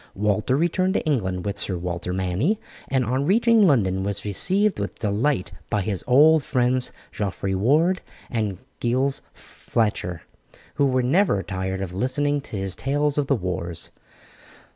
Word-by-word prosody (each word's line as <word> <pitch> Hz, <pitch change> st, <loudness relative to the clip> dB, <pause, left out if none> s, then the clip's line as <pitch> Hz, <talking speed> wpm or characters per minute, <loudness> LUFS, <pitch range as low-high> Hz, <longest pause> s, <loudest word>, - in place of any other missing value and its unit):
Walter 105 Hz, +5 st, +1 dB
returned 185 Hz, +4 st, +1 dB
to -, -, 0 dB
England 95 Hz, -, -1 dB
with 100 Hz, -, -3 dB
Sir 95 Hz, -, -2 dB
Walter 85 Hz, 0 st, -4 dB
Manny, 95 Hz, -, 0 dB, 0.3 s
and 130 Hz, -2 st, +1 dB
on 130 Hz, +5 st, 0 dB
reaching 225 Hz, +4 st, +4 dB
London 95 Hz, -, +2 dB
was 100 Hz, +1 st, -3 dB
received 190 Hz, -, +1 dB
with 100 Hz, -, -4 dB
delight 110 Hz, +2 st, 0 dB, 0.2 s
by 105 Hz, -2 st, 0 dB
his 100 Hz, -2 st, -3 dB
old 150 Hz, +4 st, +6 dB
friends 125 Hz, -1 st, +1 dB, 0.2 s
Geoffrey 95 Hz, -1 st, -2 dB
Ward 155 Hz, -, +2 dB, 0.3 s
and 110 Hz, -6 st, -2 dB, 0.2 s
Giles 130 Hz, +3 st, 0 dB
Fletcher, 105 Hz, -6 st, -3 dB, 0.5 s
who 140 Hz, -2 st, +2 dB
were 130 Hz, -1 st, +1 dB
never 135 Hz, -, +2 dB
tired 95 Hz, 0 st, -3 dB
of 90 Hz, -2 st, -6 dB
listening 145 Hz, +7 st, 0 dB
to 115 Hz, -, -7 dB
his 95 Hz, -1 st, -2 dB
tales 145 Hz, +2 st, 0 dB
of 140 Hz, -, 0 dB
the 140 Hz, -, +3 dB
wars. 90 Hz, -4 st, -3 dB
120 Hz, 150 wpm, -24 LUFS, 95-145 Hz, 0.5 s, old